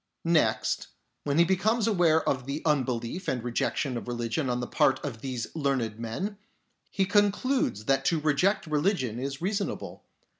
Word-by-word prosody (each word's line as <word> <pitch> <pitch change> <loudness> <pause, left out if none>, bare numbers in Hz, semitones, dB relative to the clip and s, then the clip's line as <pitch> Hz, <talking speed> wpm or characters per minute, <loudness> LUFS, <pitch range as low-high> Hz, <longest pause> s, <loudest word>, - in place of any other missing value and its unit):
Next, 165 -2 +2 0.4
when 145 0 0
he 170 - +7
becomes 205 +5 +2
aware 175 -7 +3
of 130 -2 0
the 140 +3 -3
unbelief 135 +2 -1
and 125 -3 -1
rejection 125 +2 -1
of 120 - -7
religion 120 +4 -2
on 125 0 0
the 120 - -2
part 135 +2 +2
of 115 -6 -5
these 125 -1 -5
learned 130 -8 -1
men, 185 - -4 0.5
he 195 - +1
concludes 205 - +1
that 135 +2 +2
to 165 - +2
reject 155 +7 +2
religion 150 - 0
is 135 +4 -4
reasonable. 200 +1 -3
145 Hz, 155 wpm, -28 LUFS, 125-185 Hz, 0.5 s, he